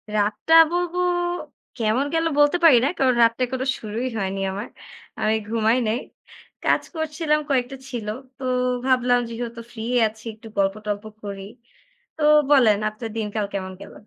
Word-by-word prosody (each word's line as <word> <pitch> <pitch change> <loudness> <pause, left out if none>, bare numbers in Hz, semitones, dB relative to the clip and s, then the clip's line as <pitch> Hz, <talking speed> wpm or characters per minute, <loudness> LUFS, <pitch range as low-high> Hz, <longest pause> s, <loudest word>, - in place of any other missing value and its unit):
রাতটা 210 +10 +1 0.2
বলবো, 355 0 -1 0.8
কেমন 230 +4 +1
গেল 325 0 +1
বলতে 290 +4 +5
পারি 305 -7 +8
না। - - +3
কারণ 260 -2 +3
রাতটা 230 +2 +2
এখনও 260 +2 -3
শুরুই 225 +4 -4
হয়নি 195 -1 -2
আমার। 200 +3 -5 0.5
আমি 215 +1 +2
ঘুমাই 225 +1 +2
নাই। 220 +3 0 0.6
কাজ - - +2
করছিলাম, 310 -1 0
কয়েকটা 260 -1 0
ছিল। 235 -4 -5 0.3
তো 265 - -10 0.4
ভাবলাম 250 -2 +3
যেহেতু 235 0 -6
ফ্রি 220 -2 -7 0.2
আছি, 215 +1 -12
একটু 220 +1 -14
গল্প-টল্প 205 +1 -1 0.2
করি। 200 -1 -6 0.7
তো - - -7 0.3
বলেন 235 -7 +6
আপনার 220 +2 -7
দিনকাল 210 -1 -2
কেমন 190 -1 -4
গেল? - - -11
230 Hz, 145 wpm, -23 LUFS, 210-265 Hz, 0.8 s, পারি